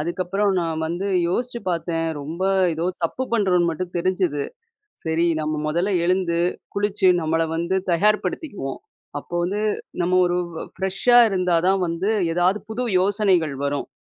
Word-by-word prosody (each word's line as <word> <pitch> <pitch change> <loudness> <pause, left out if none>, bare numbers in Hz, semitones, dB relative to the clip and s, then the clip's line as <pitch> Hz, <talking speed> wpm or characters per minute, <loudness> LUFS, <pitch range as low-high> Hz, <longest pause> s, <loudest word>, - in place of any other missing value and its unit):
அதுக்கப்பறம் 185 +5 0
நான் 165 -2 -2
வந்து 175 +4 -3 0.2
யோசிச்சு 240 +6 -2
பார்த்தேன். 165 -1 -1
ரொம்ப 160 +6 -5 0.3
ஏதோ 160 +1 -3 0.2
தப்பு 210 +10 -2
பண்ணுறோன்னு 185 -6 +2
மட்டும் 175 +2 -5
தெரிஞ்சது. 175 -4 0 0.6
சரி 160 +1 +1
நம்ம 155 0 -2
முதல்ல 175 +6 0
எழுந்து, 180 -2 +1 0.4
குளிச்சு, 205 -1 +1
நம்மள 160 +1 0
வந்து 170 +3 -1 0.2
தயார்ப்படுத்திக்குவோம். 205 - 0 0.4
அப்போ 145 - -14
வந்து 200 +4 -1 0.4
நம்ம 175 +1 0
ஒரு 175 0 0 0.4
ஃப்ரெஷா 195 +6 +2
இருந்தா 180 -3 +1
தான் 195 0 +3
வந்து, 170 +5 -1 0.2
ஏதாவது 180 +4 +2
புது 240 +3 -2 0.2
யோசனைகள் 190 -6 +2
வரும், 140 0 -2
180 Hz, 135 wpm, -22 LUFS, 165-195 Hz, 0.6 s, தான்